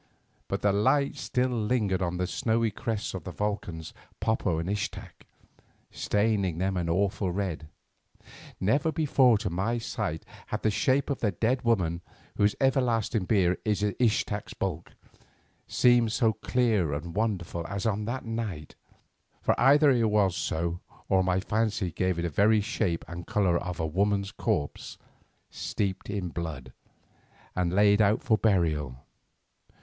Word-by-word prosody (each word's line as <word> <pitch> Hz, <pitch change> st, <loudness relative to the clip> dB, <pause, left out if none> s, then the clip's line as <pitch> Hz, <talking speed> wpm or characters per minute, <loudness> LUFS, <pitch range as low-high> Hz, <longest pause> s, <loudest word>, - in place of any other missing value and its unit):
But -, -, -3 dB
the 100 Hz, -1 st, +3 dB
light 140 Hz, +8 st, +2 dB
still 125 Hz, +1 st, 0 dB
lingered 105 Hz, -4 st, 0 dB
on 90 Hz, -1 st, -1 dB
the 90 Hz, -, 0 dB
snowy 110 Hz, +4 st, 0 dB
crests 110 Hz, 0 st, -3 dB
of 95 Hz, -4 st, -5 dB
the -, -, -6 dB
volcans 90 Hz, -6 st, -4 dB, 0.3 s
Popo 105 Hz, -5 st, 0 dB
and 85 Hz, +1 st, -3 dB
Ixtac, 100 Hz, +1 st, -5 dB, 0.6 s
staining 105 Hz, -5 st, 0 dB
them 95 Hz, +2 st, 0 dB
an 85 Hz, -2 st, -1 dB
awful 95 Hz, +1 st, 0 dB
red. 90 Hz, -5 st, -3 dB, 0.9 s
Never 140 Hz, +11 st, +2 dB
before 135 Hz, -7 st, +4 dB
to 100 Hz, -3 st, -3 dB
my 100 Hz, +7 st, 0 dB
sight 105 Hz, -8 st, -4 dB, 0.2 s
had 105 Hz, -, -4 dB
the 110 Hz, -, +3 dB
shape 135 Hz, +6 st, +1 dB
of 140 Hz, -, -2 dB
the 110 Hz, -, +1 dB
dead 115 Hz, +7 st, 0 dB
woman 90 Hz, -8 st, +1 dB, 0.3 s
whose 105 Hz, 0 st, +2 dB
everlasting 120 Hz, -6 st, +1 dB
bier 90 Hz, -3 st, +2 dB
is 105 Hz, -1 st, 0 dB
Ixtac's 105 Hz, -1 st, 0 dB
bulk, 90 Hz, -4 st, -4 dB, 0.7 s
seemed 120 Hz, -2 st, +4 dB
so 110 Hz, 0 st, +2 dB
clear 110 Hz, -, +1 dB
and 85 Hz, +4 st, -5 dB
wonderful 90 Hz, -6 st, -2 dB
as 100 Hz, +1 st, -4 dB
on 105 Hz, -1 st, 0 dB
that 120 Hz, +3 st, -4 dB
night, 110 Hz, -10 st, -4 dB, 0.7 s
for -, -, +2 dB
either 145 Hz, +3 st, +6 dB
it 115 Hz, -4 st, +2 dB
was 100 Hz, -4 st, +2 dB
so 85 Hz, 0 st, -2 dB, 0.3 s
or 95 Hz, -1 st, +4 dB
my 90 Hz, 0 st, +1 dB
fancy 105 Hz, -2 st, -1 dB
gave 95 Hz, +2 st, -1 dB
it 85 Hz, -, -2 dB
the 85 Hz, -, 0 dB
very 105 Hz, +7 st, +4 dB
shape 105 Hz, -5 st, -1 dB
and 85 Hz, 0 st, -8 dB
colour 90 Hz, -5 st, +2 dB
of 90 Hz, 0 st, -5 dB
a 80 Hz, -, 0 dB
woman's 100 Hz, +4 st, 0 dB
corpse 75 Hz, -7 st, -3 dB, 0.5 s
steeped 95 Hz, -1 st, -3 dB
in 100 Hz, -3 st, -3 dB
blood 75 Hz, -7 st, -6 dB, 0.8 s
and 90 Hz, -2 st, 0 dB
laid 100 Hz, +2 st, +4 dB
out 105 Hz, +4 st, +3 dB
for 125 Hz, -5 st, +3 dB
burial. 80 Hz, -, +1 dB
100 Hz, 150 wpm, -28 LUFS, 90-110 Hz, 0.9 s, either